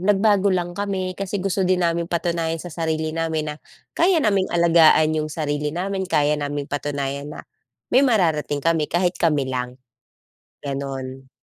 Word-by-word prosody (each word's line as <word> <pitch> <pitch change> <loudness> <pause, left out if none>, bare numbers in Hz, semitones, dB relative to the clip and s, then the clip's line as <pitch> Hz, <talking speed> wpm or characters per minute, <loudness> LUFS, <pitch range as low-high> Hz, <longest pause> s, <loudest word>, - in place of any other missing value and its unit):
nagbago 205 +1 +3
lang 175 -1 -1
kami, 190 -2 -2
kasi 195 0 -3
gusto 195 0 -1
din 180 -1 +2
naming 170 0 0
patunayan 170 -1 -1
sa 175 0 -8
sarili 160 -1 -2
namin 160 -2 -2
na, 150 - -11 0.4
kaya 355 +2 +3
naming 205 -10 +2
alagaan 165 -2 +5
yung 155 0 -1
sarili 150 -1 -2
namin. 190 +3 -2
Kaya 150 -2 +2
naming 145 0 -3
patunayan, 140 0 -3
na - - -9 0.5
may 255 - +6
mararating 165 - +1
kami, 165 -2 +1
kahit 175 +1 +1
kami 150 -5 +2
lang. 125 -1 -4 0.9
Gano'n. 135 -1 -5
165 Hz, 150 wpm, -22 LUFS, 145-185 Hz, 0.9 s, may